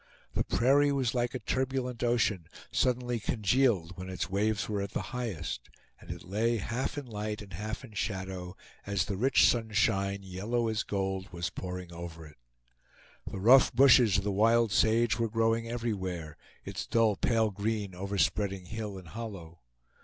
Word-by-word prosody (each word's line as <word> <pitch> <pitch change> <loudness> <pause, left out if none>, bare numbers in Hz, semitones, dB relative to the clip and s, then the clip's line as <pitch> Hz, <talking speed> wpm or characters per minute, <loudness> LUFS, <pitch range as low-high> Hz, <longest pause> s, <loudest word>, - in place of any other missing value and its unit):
The - - +1
prairie 140 +4 +3
was 135 -4 0
like 120 0 -1
a - - -2
turbulent 130 -2 -2
ocean, 115 -8 +1 0.2
suddenly 125 -1 +1
congealed 105 -5 +1
when 95 0 -6
its 90 -1 -4
waves 105 +2 0
were 105 -2 -1
at 100 -1 -5
the - - -2
highest, 95 - -4 0.3
and - - -16
it - - -6
lay 110 +6 0
half 120 +7 -3
in 145 - -4
light 105 -2 -4
and 100 - -13
half 110 +5 -5
in 110 - -15
shadow, 95 -3 -4 0.3
as 100 -4 +1
the 100 - -3
rich 125 +6 +4
sunshine, 100 -3 +1
yellow 110 +6 -1
as 110 0 0
gold, 95 0 -2
was 85 -1 -3
pouring 90 -1 -6
over 85 -1 -8
it. 75 -1 -15 0.9
The - - -5
rough 125 +8 +7
bushes 125 -6 +6
of 100 - 0
the 105 - 0
wild 115 +2 +3
sage 115 +2 +3
were 115 -1 +1
growing 115 +1 +1
everywhere, 95 -9 -3 0.3
its - - -5
dull 115 -3 +3
pale 110 +1 +1
green 105 -1 -2
overspreading 100 0 -1
hill 105 0 -5
and 90 -3 -11
hollow. 95 -7 -8
105 Hz, 165 wpm, -30 LUFS, 95-115 Hz, 0.9 s, rough